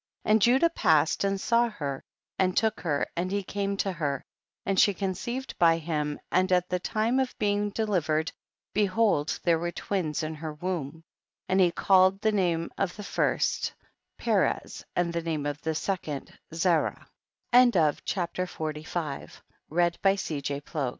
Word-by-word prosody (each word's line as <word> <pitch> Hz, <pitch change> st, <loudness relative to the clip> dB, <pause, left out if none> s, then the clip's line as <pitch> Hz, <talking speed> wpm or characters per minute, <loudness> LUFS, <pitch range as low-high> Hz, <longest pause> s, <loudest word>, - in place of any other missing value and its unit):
And 215 Hz, 0 st, +4 dB
Judah 265 Hz, -, +4 dB
passed 160 Hz, -, +3 dB
and 195 Hz, 0 st, 0 dB
saw 235 Hz, +3 st, +2 dB
her 140 Hz, -10 st, -5 dB, 0.4 s
and 185 Hz, -1 st, +2 dB
took 220 Hz, -1 st, +2 dB
her 145 Hz, -4 st, 0 dB
and 175 Hz, +2 st, -1 dB
he 200 Hz, 0 st, -1 dB
came 200 Hz, +1 st, -2 dB
to 195 Hz, -, 0 dB
her, 150 Hz, -5 st, -2 dB, 0.4 s
and 195 Hz, -1 st, +1 dB
she 205 Hz, -, +5 dB
conceived 210 Hz, +8 st, -3 dB
by 165 Hz, -1 st, +5 dB
him, 150 Hz, -2 st, -2 dB
and 185 Hz, +1 st, +2 dB
at 180 Hz, 0 st, +2 dB
the 180 Hz, -, 0 dB
time 225 Hz, +6 st, 0 dB
of 260 Hz, -1 st, -1 dB
being 205 Hz, 0 st, +1 dB
delivered, 175 Hz, -8 st, 0 dB, 0.4 s
behold^ 200 Hz, -6 st, +2 dB
there 170 Hz, -2 st, +3 dB
were 175 Hz, +1 st, -2 dB
twins 170 Hz, -6 st, -2 dB
in 155 Hz, 0 st, -3 dB
her 155 Hz, 0 st, -6 dB
womb, 165 Hz, -2 st, -4 dB, 0.4 s
and 190 Hz, +1 st, +2 dB
he 180 Hz, -2 st, +5 dB
called 190 Hz, +2 st, +4 dB
the 220 Hz, -, +3 dB
name 175 Hz, -5 st, 0 dB
of 195 Hz, -3 st, -1 dB
the 210 Hz, -, -7 dB
first -, -, 0 dB, 0.4 s
Perez, -, -, 0 dB
and 175 Hz, -1 st, 0 dB
the 170 Hz, -, -1 dB
name 160 Hz, -3 st, -2 dB
of 145 Hz, 0 st, -3 dB
the 160 Hz, 0 st, -2 dB
second 155 Hz, -5 st, -3 dB, 0.2 s
Zarah, 165 Hz, 0 st, +1 dB, 0.5 s
CHAPTER 185 Hz, -5 st, +3 dB
XLV 155 Hz, -2 st, -5 dB
180 Hz, 145 wpm, -28 LUFS, 160-200 Hz, 0.5 s, she